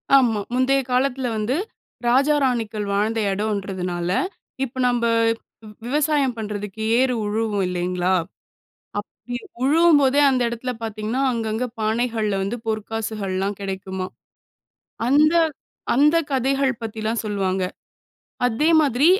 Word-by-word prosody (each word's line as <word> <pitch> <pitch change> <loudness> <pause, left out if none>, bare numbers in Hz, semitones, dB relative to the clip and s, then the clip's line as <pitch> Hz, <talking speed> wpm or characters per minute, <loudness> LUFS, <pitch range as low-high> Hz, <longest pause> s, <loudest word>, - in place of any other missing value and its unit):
ஆமா. 235 -6 +4
முந்தைய 265 +2 +3
காலத்தில 255 0 +1
வந்து 220 +6 0 0.5
ராஜா, 275 +5 +4
ராணிகள் 225 -5 0
வாழ்ந்த 220 +3 +1
இடம்ன்றதனால, 190 -4 -2 0.5
இப்போ, 260 0 -5
நம்ப 240 -1 +1 0.6
வ் 210 - -10
விவசாயம் 290 -1 +1
பண்றதுக்கு 210 -1 -5 0.2
ஏறு 255 0 +3
உழுவோம் 210 -2 0
இல்லைங்களா, 180 0 -1 0.9
அப்பிடி 245 +3 -7 0.3
உழுவும்போதே 290 -2 +5
அந்த 255 -2 +1
இடத்தில 235 +2 -3
பாத்தீங்கன்னா, 220 +4 -2
அங்கங்க 225 +1 -1
பானைகள்ல 220 -2 0
வந்து 225 +5 -2
பொற்காசுகள்லாம் 210 -3 -2
கிடைக்குமாம். 190 -1 -4 0.9
அந்த 300 +4 +5 0.6
அந்த 295 +6 +5
கதைகள் 270 +1 +1
பத்திலாம் 220 +1 -2
சொல்வாங்க. 190 -2 0 0.8
அதே 245 +6 +1
மாதிரி 280 0 +3
225 Hz, 105 wpm, -22 LUFS, 205-260 Hz, 0.9 s, உழுவும்போதே